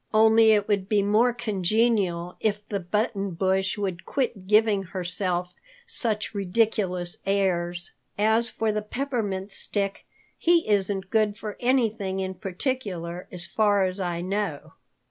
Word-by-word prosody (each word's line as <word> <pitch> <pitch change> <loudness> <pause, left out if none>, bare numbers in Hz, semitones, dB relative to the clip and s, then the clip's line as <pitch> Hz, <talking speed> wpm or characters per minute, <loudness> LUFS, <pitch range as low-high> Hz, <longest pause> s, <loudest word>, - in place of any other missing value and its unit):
"Only 220 +1 +6
it 205 -1 +2
would 200 -2 0
be 205 -2 +3
more 215 +5 +4
congenial 205 -5 0
if 210 -1 -1
the 200 - -2
Button 195 0 -1
Bush 190 +2 +1
would 190 -4 -3
quit 235 -9 -2
giving 210 -1 +4
herself 180 -1 -3 0.3
such 225 - 0
ridiculous 195 -3 0
airs. 175 -3 0 0.3
As 220 +3 +3
for 220 0 -1
the 210 0 -1
Peppermint 210 -5 -3
Stick, 195 0 -2 0.3
he 340 0 +3
isn't 195 -2 0
good 215 -2 +2
for 215 -2 -6
anything 225 -6 +1
in 190 0 -2
particular 185 - -4
as 175 -2 -5
far 205 -2 +2
as 185 +1 -3
I 175 -2 -2
know. 180 -5 -3
200 Hz, 135 wpm, -26 LUFS, 185-220 Hz, 0.3 s, Only